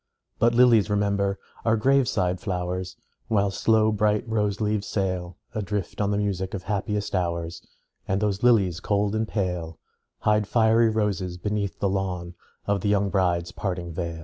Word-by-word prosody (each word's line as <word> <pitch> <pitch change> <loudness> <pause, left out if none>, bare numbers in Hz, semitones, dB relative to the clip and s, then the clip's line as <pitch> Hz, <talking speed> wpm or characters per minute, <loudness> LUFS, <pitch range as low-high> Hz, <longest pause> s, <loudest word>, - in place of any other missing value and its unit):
But 120 +1 +3
lilies, 120 -4 +5
remember, 100 -1 +1 0.3
are 115 0 +3
grave 135 +3 +3
side 90 -4 0
flowers, 90 -1 -3 0.3
While 100 -3 +2
slow 110 +2 +3
bright 105 +1 +1
rose 105 -3 0
leaves 105 -1 -1
sail 90 -3 -2 0.2
Adrift 105 -2 -3
on 100 - +1
the 100 - 0
music 100 -2 -2
of 95 - -6
happiest 105 +1 -2
hours; 85 -2 -2 0.5
And 95 +1 +1
those 100 -2 -1
lilies, 100 -9 +3
cold 100 +2 0
and 110 0 0
pale, 90 -6 -3 0.4
Hide 105 -1 +2
fiery 115 0 +4
roses 100 -5 -1
beneath 100 0 -2
the 100 - 0
lawn 90 -3 -2 0.3
Of 100 -1 0
the 100 - 0
young 100 -1 +2
bride's 85 -3 +1
parting 90 -3 -4
veil. 85 -1 -4
100 Hz, 160 wpm, -25 LUFS, 90-105 Hz, 0.5 s, lilies